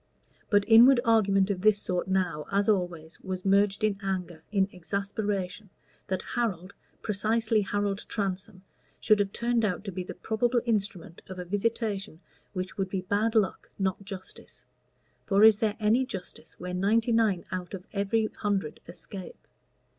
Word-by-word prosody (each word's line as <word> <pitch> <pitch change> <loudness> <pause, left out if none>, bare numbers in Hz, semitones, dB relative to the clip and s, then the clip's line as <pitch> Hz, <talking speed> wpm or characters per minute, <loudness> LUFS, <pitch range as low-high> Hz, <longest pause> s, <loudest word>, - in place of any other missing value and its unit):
But 205 -2 +4
inward 240 +3 +8
argument 200 -3 +3
of 185 -2 -3
this 215 0 +5
sort 180 -3 -1
now, 180 -6 -1
as 200 0 +2
always, 175 -6 -1
was 185 0 -5
merged 200 +1 +3
in 205 -2 +1
anger, 180 -4 -3
in 195 -2 +2
exasperation, 200 +2 -3 0.4
that 185 0 -2
Harold, 200 -6 -2 0.3
precisely 220 +1 +1
Harold 205 0 -1
Transome, 195 -1 -4 0.4
should 215 -1 +4
have 200 -1 +1
turned 235 0 0
out 200 -3 0
to 200 - -5
be 185 0 -4
the - - -8
probable 240 +2 +1
instrument 200 -7 -2
of 185 - -8
a 180 - -5
visitation 205 -2 -2 0.3
which 185 0 -5
would 190 -1 0
be 190 -1 -2
bad 205 +5 0
luck, 210 -4 +1
not 195 0 -1
justice; 195 -2 -9 0.6
for 200 0 +3
is 220 -2 +8
there 215 -2 0
any 220 +4 +3
justice 200 -8 -8
where 180 0 -5
ninety 220 +6 +2
nine 220 -6 +2
out 185 0 -4
of 185 0 -10
every 210 +2 +1
hundred 200 -7 -1
escape? 180 +2 -9
200 Hz, 155 wpm, -28 LUFS, 185-215 Hz, 0.6 s, inward